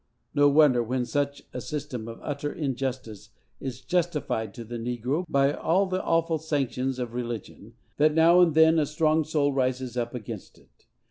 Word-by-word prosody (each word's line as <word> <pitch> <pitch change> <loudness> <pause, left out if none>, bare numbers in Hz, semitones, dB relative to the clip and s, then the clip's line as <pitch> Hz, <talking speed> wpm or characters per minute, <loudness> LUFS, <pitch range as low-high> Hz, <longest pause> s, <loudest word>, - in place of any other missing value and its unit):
No 145 0 +5
wonder, 140 -4 +5
when 125 +2 -1
such 145 +1 -2
a 125 - -4
system 125 -6 -5
of 115 - -8
utter 145 0 -3
injustice 130 -6 -4 0.3
is 130 -1 -6
justified 150 - -1
to 120 - -7
the 120 +1 -6
negro 125 +8 -2
by 140 0 +3
all 180 +7 +1
the 185 0 -2
awful 165 -1 +1
sanctions 135 -4 -1
of 120 -2 -4
religion, 115 -2 -6 0.2
that 150 +1 +3
now 170 +2 +6
and 165 -4 +4
then 160 0 +6
a 150 - +1
strong 155 +1 +2
soul 145 -2 0
rises 130 -1 -1
up 120 0 -2
against 110 -3 -8
it. - - -27
140 Hz, 175 wpm, -26 LUFS, 120-155 Hz, 0.3 s, now